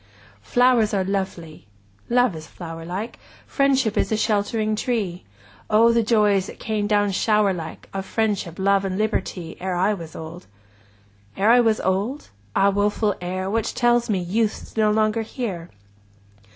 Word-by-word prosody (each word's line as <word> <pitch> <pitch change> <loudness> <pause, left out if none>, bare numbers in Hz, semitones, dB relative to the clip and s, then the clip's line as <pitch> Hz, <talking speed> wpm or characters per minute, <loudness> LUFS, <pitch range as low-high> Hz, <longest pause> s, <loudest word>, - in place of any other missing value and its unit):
Flowers 240 - +3
are 190 - +1
lovely! 185 - -4 0.4
Love 245 -5 +3
is 155 0 -9
flower 165 -2 -8
like; 190 +7 -5 0.3
Friendship 270 -6 +1
is - - 0
a 220 - +2
sheltering 215 0 0
tree; 210 -7 -2 0.4
O 225 +2 +5
the 230 - +3
joys, 210 -4 +2
that - - -10
came 215 -2 -2
down 205 -1 +2
shower 210 0 +2
like, 165 -3 -7
20 195 - -4
Of 190 - -5
Friendship, 205 -7 -1
Love, 195 0 +2
and 190 -1 -2
Liberty, 195 -5 -2
Ere 185 -1 -2
I 190 +4 +2
was 165 -5 -8
old! 160 +2 -9 0.9
Ere 210 +3 +4
I 245 - +7
was 225 -2 +3
old? 200 +10 -1 0.3
Ah, 200 +1 +4
woful 205 +1 +1
Ere, 185 +1 -3
Which 225 +4 -1
tells 240 -1 +2
me, 205 - +2
Youth 205 +5 -1
's - - -20
no 215 -1 +3
longer 215 +1 +2
here! 205 -7 -5
205 Hz, 165 wpm, -23 LUFS, 185-225 Hz, 0.9 s, I